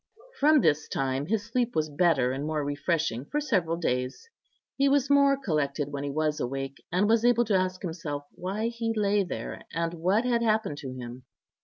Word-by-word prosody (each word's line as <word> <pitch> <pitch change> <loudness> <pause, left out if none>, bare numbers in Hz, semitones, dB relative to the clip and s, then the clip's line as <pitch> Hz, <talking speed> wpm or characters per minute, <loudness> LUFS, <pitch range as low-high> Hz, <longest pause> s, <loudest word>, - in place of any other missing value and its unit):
From 300 0 +5
this 155 -1 +2
time 135 +1 -1
his 215 +1 0
sleep 240 +1 -1
was 155 -1 +1
better 145 -5 +2
and 135 +2 -3
more 155 -2 -1
refreshing 145 -3 -1
for 295 - -2
several 185 - 0
days; 125 - -2 0.5
he 275 0 +3
was 280 0 +2
more 280 -1 +5
collected 150 - -1
when 140 0 -3
he 145 - -2
was 155 +1 -1
awake, 135 +2 -4
and 185 +4 +2
was 225 +1 +3
able 240 0 +4
to 210 -2 +1
ask 185 0 0
himself 160 -5 -4
why 195 +6 -3
he 230 -1 -2
lay 205 -1 +2
there, 180 - -6
and 165 0 -2
what 185 +8 +1
had 240 -2 +2
happened 215 -9 0
to 135 -3 -6
him. 125 0 -8
170 Hz, 190 wpm, -27 LUFS, 145-225 Hz, 0.5 s, From